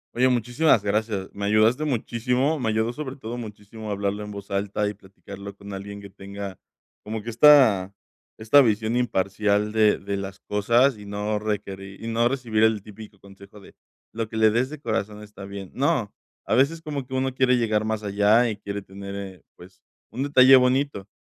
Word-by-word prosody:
Oye, 130 Hz, +2 st, +3 dB
muchísimas 125 Hz, 0 st, +2 dB
gracias. 105 Hz, -1 st, -2 dB
Me 100 Hz, 0 st, -4 dB
ayudaste 110 Hz, +8 st, +3 dB
muchísimo, 125 Hz, +3 st, 0 dB
me 120 Hz, -4 st, -1 dB
ayudó 110 Hz, +2 st, 0 dB
sobre 135 Hz, -1 st, -6 dB
todo 120 Hz, -3 st, -7 dB
muchísimo 105 Hz, 0 st, -9 dB
hablarlo 100 Hz, 0 st, -2 dB
en 105 Hz, -, -8 dB
voz 100 Hz, -1 st, -9 dB
alta 100 Hz, +1 st, -1 dB
y 105 Hz, -, -3 dB
platicarlo 100 Hz, 0 st, -11 dB
con 100 Hz, 0 st, -10 dB
alguien 100 Hz, +1 st, -7 dB
que 100 Hz, -1 st, -12 dB
tenga 100 Hz, 0 st, -8 dB, 0.4 s
como 110 Hz, 0 st, -5 dB
que 115 Hz, -, -5 dB
esta 115 Hz, -7 st, +6 dB, 0.5 s
esta 110 Hz, +6 st, +5 dB
visión 110 Hz, -1 st, +1 dB
imparcial 105 Hz, -2 st, 0 dB
de 110 Hz, -1 st, +3 dB
de 100 Hz, +1 st, -4 dB
las 95 Hz, 0 st, -7 dB
cosas 115 Hz, +4 st, +2 dB
y 105 Hz, -, -11 dB
no 105 Hz, +1 st, -2 dB
requerir 100 Hz, -2 st, -5 dB
y -, -, -5 dB
no 115 Hz, +1 st, +2 dB
recibir 120 Hz, -4 st, -1 dB
el 110 Hz, -2 st, +2 dB
típico 105 Hz, -1 st, -13 dB
consejo 100 Hz, +1 st, -15 dB
de: 100 Hz, -, -16 dB, 0.4 s
"Lo 115 Hz, -1 st, -4 dB
que 110 Hz, -, -6 dB
le 110 Hz, -1 st, +5 dB
des 120 Hz, +4 st, 0 dB
de 155 Hz, 0 st, -8 dB
corazón 105 Hz, -4 st, -3 dB
está 105 Hz, -2 st, -11 dB
bien". 100 Hz, -1 st, -8 dB
No, 135 Hz, -6 st, 0 dB, 0.3 s
a -, -, -1 dB
veces 140 Hz, +7 st, +2 dB
como 145 Hz, -5 st, -5 dB
que 130 Hz, -, -5 dB
uno 130 Hz, 0 st, -1 dB
quiere 130 Hz, -1 st, +3 dB
llegar 110 Hz, -3 st, +1 dB
más 110 Hz, 0 st, -2 dB
allá 105 Hz, +4 st, +3 dB
y 105 Hz, -, -6 dB
quiere 100 Hz, -1 st, -6 dB
tener, 100 Hz, 0 st, -9 dB
eh, 95 Hz, -3 st, -8 dB
pues, 90 Hz, +2 st, -16 dB, 0.3 s
un 130 Hz, -, -5 dB
detalle 135 Hz, -2 st, +6 dB
bonito. 125 Hz, -5 st, +1 dB
110 Hz, 190 wpm, -24 LUFS, 100-120 Hz, 0.5 s, esta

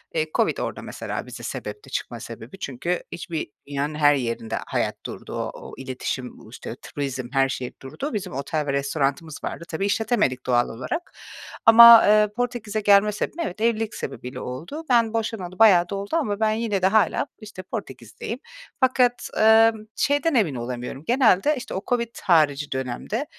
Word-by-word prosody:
eee, 155 Hz, 0 st, +1 dB
Covid -, -, +2 dB
orada -, -, -4 dB
mesela -, -, -5 dB
bize -, -, -9 dB
sebepti, 425 Hz, -, -6 dB
çıkma -, -, -4 dB
sebebi. 195 Hz, -, -10 dB
Çünkü 170 Hz, +7 st, -3 dB
hiçbir 170 Hz, -4 st, -4 dB, 0.2 s
dünyanın 145 Hz, +1 st, -2 dB
her 145 Hz, -1 st, +5 dB
yerinde 115 Hz, -3 st, -3 dB
hayat -, -, -1 dB
durdu. -, -, -8 dB
O -, -, -3 dB
o -, -, -10 dB
iletişim, 130 Hz, -1 st, -5 dB
u 110 Hz, -, -15 dB
işte 115 Hz, -1 st, -8 dB
turizm, 135 Hz, -3 st, -4 dB
her 135 Hz, 0 st, +3 dB
şey 125 Hz, -2 st, -4 dB
durdu. 155 Hz, -, -6 dB
Bizim 205 Hz, -9 st, -4 dB
otel 145 Hz, +3 st, -2 dB
ve 140 Hz, -, 0 dB
restoranımız 140 Hz, +2 st, -2 dB
vardı. -, -, -5 dB
Tabii 170 Hz, +5 st, -2 dB
işletemedik 200 Hz, -, 0 dB
doğal 120 Hz, -1 st, +2 dB
olarak. 130 Hz, -, -5 dB, 0.5 s
Ama, 230 Hz, 0 st, +10 dB
eee, 210 Hz, 0 st, +5 dB
Portekiz'e 230 Hz, -3 st, -2 dB
gelme 205 Hz, +1 st, +5 dB
sebebim, 210 Hz, +10 st, -4 dB
evet, 185 Hz, +4 st, -6 dB
evlilik 225 Hz, -1 st, 0 dB
sebebiyle 125 Hz, +1 st, -6 dB
oldu. 160 Hz, -, -6 dB
Ben 230 Hz, -3 st, +3 dB
boşanalı 220 Hz, -5 st, -3 dB
bayağı 180 Hz, -6 st, +6 dB
da 200 Hz, -, -3 dB
oldu 200 Hz, +1 st, -5 dB
ama 210 Hz, -11 st, 0 dB
ben 220 Hz, -1 st, +2 dB
yine 215 Hz, -3 st, -1 dB
de 190 Hz, -, +4 dB
hâlâ, 220 Hz, +6 st, +2 dB
işte, 210 Hz, -4 st, -10 dB
Portekiz'deyim. 180 Hz, -, -7 dB, 0.4 s
Fakat, 255 Hz, -2 st, +2 dB
emm, 220 Hz, 0 st, +5 dB
şeyden 290 Hz, +3 st, +1 dB
emin 180 Hz, -, +2 dB
olamıyorum, 125 Hz, +3 st, -5 dB
genelde, 255 Hz, +2 st, +4 dB
işte, 250 Hz, -, -7 dB
o 190 Hz, -, -2 dB
Covid 235 Hz, -2 st, -1 dB
harici 150 Hz, -6 st, +3 dB
dönemde, 130 Hz, -, -3 dB
190 Hz, 165 wpm, -24 LUFS, 140-225 Hz, 0.5 s, Ama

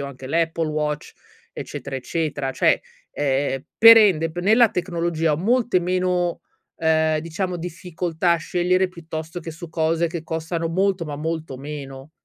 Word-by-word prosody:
ho 140 Hz, -, -4 dB
anche 130 Hz, -1 st, -9 dB
l'Apple 165 Hz, +1 st, 0 dB
Watch, 150 Hz, -1 st, -3 dB, 0.4 s
eccetera, 135 Hz, -, -6 dB
eccetera. 145 Hz, -1 st, -2 dB
Cioè, -, -, +3 dB, 0.3 s
ehm, 135 Hz, -1 st, -1 dB
per 230 Hz, 0 st, +10 dB
ende 170 Hz, -7 st, +4 dB
b 175 Hz, -, -9 dB
nella 220 Hz, +6 st, +5 dB
tecnologia 170 Hz, -3 st, -1 dB
ho -, -, +1 dB
molte 230 Hz, +1 st, +2 dB
meno, 180 Hz, -1 st, 0 dB, 0.4 s
ehm, 160 Hz, -1 st, +2 dB
diciamo, 175 Hz, +3 st, -3 dB
difficoltà 175 Hz, 0 st, -2 dB
a -, -, +1 dB
scegliere 180 Hz, +3 st, +1 dB
piuttosto 165 Hz, -1 st, -7 dB
che 165 Hz, -, -7 dB
su 165 Hz, +1 st, -9 dB
cose 165 Hz, +1 st, +1 dB
che 165 Hz, -1 st, -5 dB
costano 165 Hz, +1 st, -3 dB
molto, 190 Hz, 0 st, 0 dB
ma 145 Hz, -2 st, -5 dB
molto 160 Hz, -3 st, -4 dB
meno. 140 Hz, 0 st, -8 dB
165 Hz, 150 wpm, -22 LUFS, 155-180 Hz, 0.4 s, per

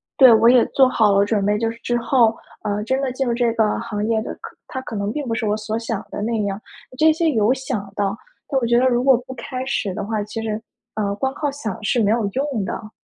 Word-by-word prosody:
对 260 Hz, -3 st, +8 dB
我 225 Hz, +1 st, +5 dB
也 250 Hz, -2 st, +6 dB
做 265 Hz, -1 st, +4 dB
好 220 Hz, -5 st, +3 dB
了 200 Hz, -, +4 dB
准 205 Hz, -2 st, 0 dB
备， 210 Hz, 0 st, +2 dB
就 225 Hz, +1 st, 0 dB
是 230 Hz, -, -7 dB
之 240 Hz, 0 st, -1 dB
后， 235 Hz, -1 st, +3 dB, 0.3 s
呃， 210 Hz, -1 st, -1 dB
真 260 Hz, +3 st, 0 dB
的 265 Hz, -2 st, -1 dB
进 265 Hz, +1 st, -2 dB
入 235 Hz, -, +1 dB
这 235 Hz, -1 st, +1 dB
个 220 Hz, -2 st, +2 dB
行 210 Hz, -1 st, -3 dB
业 225 Hz, -1 st, +1 dB
的， -, -, -6 dB, 0.3 s
它 260 Hz, -, -5 dB
可 225 Hz, -, -7 dB
能 200 Hz, +1 st, -2 dB
并 290 Hz, 0 st, -4 dB
不 225 Hz, -, -1 dB
是 225 Hz, -, -2 dB
我 210 Hz, 0 st, +1 dB
所 215 Hz, +1 st, -3 dB
想 225 Hz, -2 st, -3 dB
的 -, -, -4 dB
那 225 Hz, 0 st, -1 dB
样， 200 Hz, +1 st, -3 dB, 0.4 s
这 315 Hz, 0 st, +5 dB
些 325 Hz, +1 st, +1 dB
有 220 Hz, -1 st, +3 dB
想 225 Hz, -7 st, -4 dB
到， 200 Hz, 0 st, -1 dB, 0.3 s
但 275 Hz, -, 0 dB
我 -, -, +1 dB
觉 235 Hz, +1 st, +3 dB
得 255 Hz, -, +2 dB
如 245 Hz, -1 st, +2 dB
果 265 Hz, -2 st, +5 dB
不 260 Hz, -, -6 dB
开 255 Hz, +1 st, -5 dB
始 215 Hz, -7 st, -1 dB
的 195 Hz, -, -4 dB
话， 215 Hz, -1 st, -2 dB
其 215 Hz, +2 st, -6 dB
实， 220 Hz, 0 st, -3 dB, 0.3 s
呃， 205 Hz, -2 st, -1 dB
光 265 Hz, +5 st, -2 dB
靠 290 Hz, -1 st, -2 dB
想 220 Hz, -7 st, -6 dB
是 235 Hz, +4 st, +1 dB
没 205 Hz, -, +2 dB
有 225 Hz, -1 st, +2 dB
用 260 Hz, +1 st, -2 dB
的。 215 Hz, +2 st, -6 dB
225 Hz, 280 characters per minute, -21 LUFS, 210-255 Hz, 0.4 s, 对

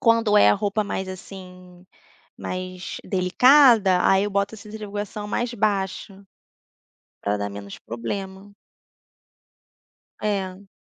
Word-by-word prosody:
Quando 230 Hz, -2 st, +3 dB
é 155 Hz, -, +7 dB
a 105 Hz, -, +5 dB
roupa 205 Hz, -, -1 dB
mais, 190 Hz, -1 st, -4 dB
assim, 180 Hz, -1 st, -11 dB, 0.5 s
mais 185 Hz, 0 st, -6 dB
delicada, 210 Hz, 0 st, +5 dB
aí 195 Hz, +1 st, +4 dB
eu 205 Hz, -, -2 dB
boto 200 Hz, +2 st, -1 dB
a -, -, -11 dB
centrifugação 210 Hz, 0 st, -6 dB
mais 240 Hz, +3 st, -2 dB
baixa, 200 Hz, -2 st, -2 dB, 1.0 s
pra 100 Hz, +1 st, -1 dB
dar 100 Hz, 0 st, -3 dB
menos 100 Hz, 0 st, -9 dB
problema. 190 Hz, -, -6 dB, 1.7 s
É. 195 Hz, -2 st, -3 dB
195 Hz, 110 wpm, -23 LUFS, 185-210 Hz, 1.7 s, é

